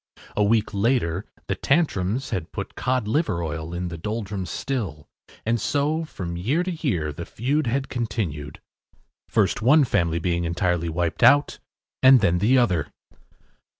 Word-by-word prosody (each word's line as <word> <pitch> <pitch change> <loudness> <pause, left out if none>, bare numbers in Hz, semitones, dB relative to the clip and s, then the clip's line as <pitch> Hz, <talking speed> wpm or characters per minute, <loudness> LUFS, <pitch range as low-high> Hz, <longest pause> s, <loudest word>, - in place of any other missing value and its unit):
A 105 - +2
week 110 +1 +2
later 100 -4 +1 0.2
the - - -1
Tantrums 130 - 0
had 95 -7 -3
put - - -6
Cod 125 -4 -1
Liver 110 - 0
Oil 80 +1 -4
in 90 0 -3
the 85 -1 -7
Doldrums’ 100 -2 -4
still, 100 - -4 0.4
and 115 0 +1
so, 150 +6 0
from 85 - -6
year 130 - 0
to 185 - -3
year, 105 - -2
the 85 - -6
feud 135 - -1
had 135 +3 0
continued, 90 - -4 0.7
first - - +1
one 145 +6 +6
family 85 -9 +1
being 85 0 -1
entirely 85 0 0
wiped 85 0 -2
out, 145 +1 +5 0.4
then 115 -10 +6
the 120 +7 +4
other. 90 - +2
105 Hz, 150 wpm, -24 LUFS, 85-130 Hz, 0.7 s, one